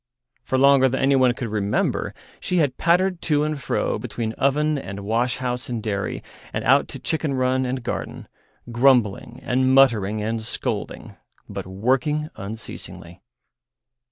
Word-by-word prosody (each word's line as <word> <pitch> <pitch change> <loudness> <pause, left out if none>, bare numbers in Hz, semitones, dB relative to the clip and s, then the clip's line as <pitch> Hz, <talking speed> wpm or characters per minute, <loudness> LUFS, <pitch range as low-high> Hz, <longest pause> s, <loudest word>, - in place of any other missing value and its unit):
For 130 - -1
longer 135 0 +5
than 130 - -2
anyone 130 -2 +3
could 120 -2 -4
remember 105 -1 -1 0.2
she 180 - -1
had 145 -6 +2
pattered 180 +1 +2
to 150 -2 +1
and 150 -2 -2
fro - - -1
between 110 -2 -4
oven 150 +3 +1
and 100 -5 -7
wash 115 +4 0
house 125 -1 -3
and 115 -3 -3
dairy, 100 -3 -3 0.3
and - - -3
out - - +4
to - - -7
chicken 155 -3 -1
run 130 0 +1
and 130 0 -3
garden, - - -5 0.4
grumbling 120 -4 +2
and 130 +1 +2
muttering 110 -6 +4
and 110 +2 -2
scolding, 110 - -4 0.3
but - - -6
working 130 +10 0
unceasingly. 95 -4 -8
130 Hz, 145 wpm, -23 LUFS, 110-140 Hz, 0.4 s, longer